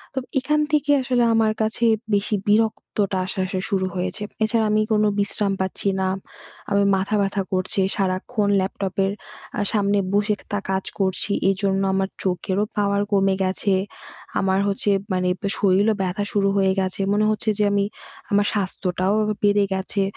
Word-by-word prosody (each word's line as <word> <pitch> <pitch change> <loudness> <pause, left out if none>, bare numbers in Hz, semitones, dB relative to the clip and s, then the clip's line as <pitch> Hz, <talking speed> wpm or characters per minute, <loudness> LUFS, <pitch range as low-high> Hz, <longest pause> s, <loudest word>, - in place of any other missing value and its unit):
তো - - +1 0.2
এখান 300 +4 +1
থেকে 295 -1 +2
আসলে 250 -2 +1
আমার 225 -1 +3
কাছে 220 +2 0 0.3
বেশি 205 +1 +1
বিরক্তটা 210 -2 +1
আসা, 190 - -5
আসা 185 0 -3
শুরু 195 -3 +1
হয়েছে। 185 +3 -3 0.2
এছাড়া 220 0 +2
আমি 215 0 +3
কোনো 215 0 +3
বিশ্রাম 200 0 +1
পাচ্ছি 190 +1 -3
না 190 - +1 0.6
আমি 200 0 +3
মাথা 195 +3 -1
ব্যথা 195 0 0
করছে। 185 +1 -1 0.2
সারাক্ষণ 200 +3 -1
ল্যাপটপের 195 0 -1 0.5
আ - - +1
সামনে 200 -1 +2
বসে 205 +1 +2 0.2
তা 205 - 0
কাজ 190 0 0 0.2
করছি 190 +1 0 0.2
এইজন্য 195 0 0
আমার 190 0 0
চোখেরও 190 +2 0
পাওয়ার 200 -1 +2
কমে 195 -1 +3
গেছে। 190 +1 0 0.7
আমার 190 0 +2
হচ্ছে 200 +1 +1 0.2
মানে 180 0 +1 0.3
শরীরও 200 +2 +3
ব্যথা 190 +2 -1
শুরু 200 -1 +2
হয়ে 190 -1 +3
গেছে, 190 +1 -2
মনে 210 +1 +2
হচ্ছে 215 +1 -1
যে, - - +4
আমি 200 0 +2 0.5
আমার 205 0 +3
স্বাস্থ্যটাও 185 -1 -1 0.3
বেড়ে 205 0 +4
গেছে। 190 +1 -1
200 Hz, 155 wpm, -22 LUFS, 190-210 Hz, 0.7 s, যে